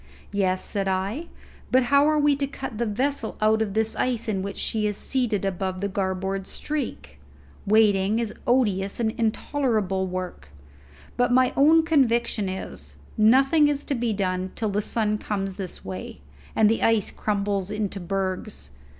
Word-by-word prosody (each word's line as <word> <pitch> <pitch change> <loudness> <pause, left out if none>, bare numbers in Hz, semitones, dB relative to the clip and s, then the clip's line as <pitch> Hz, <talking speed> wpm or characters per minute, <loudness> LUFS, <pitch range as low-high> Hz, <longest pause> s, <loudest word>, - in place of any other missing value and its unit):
"Yes," 185 -2 0
said 195 -1 -2
I, 195 - -2 0.4
"but 260 0 +5
how 280 +4 +4
are 305 0 +3
we 295 -1 +4
to 280 0 -1
cut 265 -4 -7
the 235 - 0
vessel 250 +2 -1
out 215 +1 +3
of 210 -2 -2
the 220 0 +1
ice 245 -3 0
in 200 -3 -1
which 200 +1 -5
she 215 -1 0
is 205 -1 -2
seated 240 -7 0
to 195 - +2
above 185 0 -3
the 200 - -1
garboard 190 0 -2
streak? 75 - -5 0.5
Waiting 205 -1 +4
is 230 -2 -2
odious 205 -6 +1
and 220 -2 +1
intolerable 220 -4 0
work; 180 - -5 0.7
but 245 0 +2
my 255 0 +4
own 315 +4 +6
conviction 235 - +2
is, 190 0 -5 0.2
nothing 270 +7 +5
is 290 0 0
to - - -2
be 240 -3 0
done 185 -2 -1
till 220 - -1
the 205 +1 0
sun 215 -1 0
comes 195 -2 -3
this 185 -2 -6
way, 95 -6 -7 0.3
and 220 - +5
the 225 +1 +1
ice 225 -3 +2
crumbles 200 -2 -1
into 210 -2 -3
bergs. 185 - -3
210 Hz, 165 wpm, -25 LUFS, 195-245 Hz, 0.7 s, own